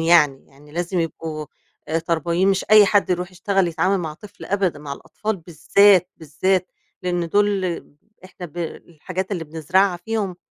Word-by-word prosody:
يعني، 160 Hz, -5 st, +4 dB
يعني 145 Hz, +2 st, -19 dB
لازم 175 Hz, +2 st, -1 dB
يبقوا 160 Hz, -2 st, -4 dB, 0.4 s
آآ 160 Hz, +1 st, +1 dB
تربويين 170 Hz, +3 st, 0 dB
مش 195 Hz, -1 st, +1 dB
أي 215 Hz, -1 st, +8 dB
حد 205 Hz, -1 st, +2 dB
يرُوح 180 Hz, 0 st, -1 dB
يشتغل 190 Hz, 0 st, +1 dB
يتعامل 180 Hz, +4 st, +1 dB
مع 160 Hz, -4 st, -4 dB
طفل 200 Hz, +5 st, -13 dB
أبدًا، 190 Hz, -6 st, 0 dB
مع 145 Hz, -1 st, -7 dB
الأطفال 215 Hz, +8 st, -4 dB
بالذات، 180 Hz, +3 st, +4 dB
بالذات 180 Hz, +4 st, 0 dB, 0.3 s
لإن 175 Hz, -2 st, -1 dB
دول 205 Hz, +1 st, +2 dB, 0.6 s
إحنا 180 Hz, -1 st, -9 dB
ب 165 Hz, +1 st, -20 dB
الحاجات 175 Hz, +3 st, -5 dB
اللي 175 Hz, -4 st, -3 dB
بنزرَعها 175 Hz, +5 st, +1 dB
فيهم 195 Hz, 0 st, -3 dB
175 Hz, 155 wpm, -22 LUFS, 160-195 Hz, 0.6 s, أي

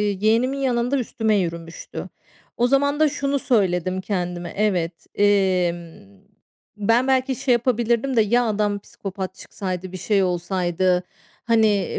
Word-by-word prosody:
yeğenimin 220 Hz, +6 st, +1 dB
yanında 250 Hz, 0 st, +1 dB
üstüme 220 Hz, -3 st, 0 dB
yürümüştü. 170 Hz, -2 st, -4 dB, 0.5 s
O 245 Hz, -, +4 dB
zaman 285 Hz, +2 st, +2 dB
da 310 Hz, -, +5 dB
şunu 280 Hz, 0 st, -1 dB
söyledim 185 Hz, -7 st, +1 dB
kendime, 175 Hz, -3 st, -3 dB
evet, 180 Hz, -5 st, -1 dB
emm, 175 Hz, -, +1 dB, 0.6 s
ben 230 Hz, +5 st, +2 dB
belki 260 Hz, -1 st, +2 dB
şey 250 Hz, -, +1 dB
yapabilirdim 240 Hz, +1 st, +1 dB
de 220 Hz, -, +6 dB
ya, 240 Hz, +4 st, +2 dB
adam 205 Hz, -1 st, 0 dB
psikopat 190 Hz, -2 st, -7 dB
çıksaydı, 185 Hz, -2 st, -6 dB
bir -, -, -5 dB
şey 200 Hz, +1 st, +1 dB
olsaydı. 180 Hz, 0 st, 0 dB, 0.4 s
Hani, 220 Hz, -5 st, +2 dB
205 Hz, 125 wpm, -22 LUFS, 180-240 Hz, 0.6 s, de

